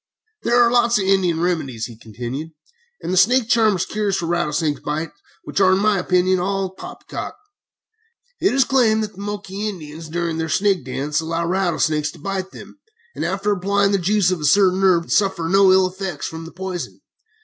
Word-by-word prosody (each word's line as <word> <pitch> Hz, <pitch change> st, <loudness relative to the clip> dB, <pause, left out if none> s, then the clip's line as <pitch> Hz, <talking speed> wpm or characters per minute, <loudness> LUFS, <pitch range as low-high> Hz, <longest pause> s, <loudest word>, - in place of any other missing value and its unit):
"There 240 Hz, +1 st, +2 dB
are 235 Hz, -1 st, +5 dB
lots 240 Hz, -1 st, +3 dB
of 200 Hz, -, 0 dB
Indian 185 Hz, -4 st, +2 dB
remedies," 155 Hz, -10 st, -1 dB
he 120 Hz, -, -10 dB
continued, 120 Hz, +8 st, -7 dB, 0.5 s
"and 185 Hz, 0 st, +1 dB
snake 235 Hz, +4 st, +3 dB
charmers' 215 Hz, -7 st, +3 dB
cures 205 Hz, -3 st, -1 dB
for 170 Hz, -, -3 dB
rattlesnake 160 Hz, -3 st, -1 dB
bites, 150 Hz, +2 st, -3 dB, 0.3 s
which -, -, -2 dB
are, 190 Hz, -1 st, +5 dB
in -, -, +3 dB
my 205 Hz, 0 st, +2 dB
opinion, 180 Hz, 0 st, +2 dB
all 190 Hz, 0 st, -2 dB
poppy -, -, -11 dB
cock. -, -, -6 dB, 1.0 s
It 385 Hz, -, +2 dB
is 270 Hz, -, +4 dB
claimed 230 Hz, -5 st, +2 dB
that 210 Hz, -, -5 dB
the 195 Hz, -, -11 dB
Moquai 205 Hz, 0 st, -4 dB
Indians, 160 Hz, -4 st, -9 dB
during 170 Hz, 0 st, -2 dB
their 160 Hz, 0 st, -2 dB
Snake 195 Hz, -3 st, +1 dB
Dance, 145 Hz, +4 st, -2 dB
allow 165 Hz, +1 st, -2 dB
rattlesnakes 165 Hz, -4 st, 0 dB
to -, -, -15 dB
bite 190 Hz, +3 st, -4 dB
them, 290 Hz, -, -13 dB, 0.3 s
and -, -, -4 dB
after 195 Hz, +3 st, -1 dB
applying 200 Hz, +1 st, +1 dB
the 200 Hz, -, +2 dB
juice 190 Hz, +1 st, +2 dB
of 180 Hz, -4 st, -2 dB
a -, -, -2 dB
certain 190 Hz, +3 st, +4 dB
herb 175 Hz, -3 st, +3 dB
suffer 190 Hz, -5 st, +1 dB
no 195 Hz, +2 st, +5 dB
ill 190 Hz, 0 st, +5 dB
effects 185 Hz, -4 st, -5 dB
from 160 Hz, 0 st, -7 dB
the 165 Hz, -, -10 dB
poison. 185 Hz, -1 st, -6 dB
185 Hz, 190 wpm, -20 LUFS, 165-200 Hz, 1.0 s, are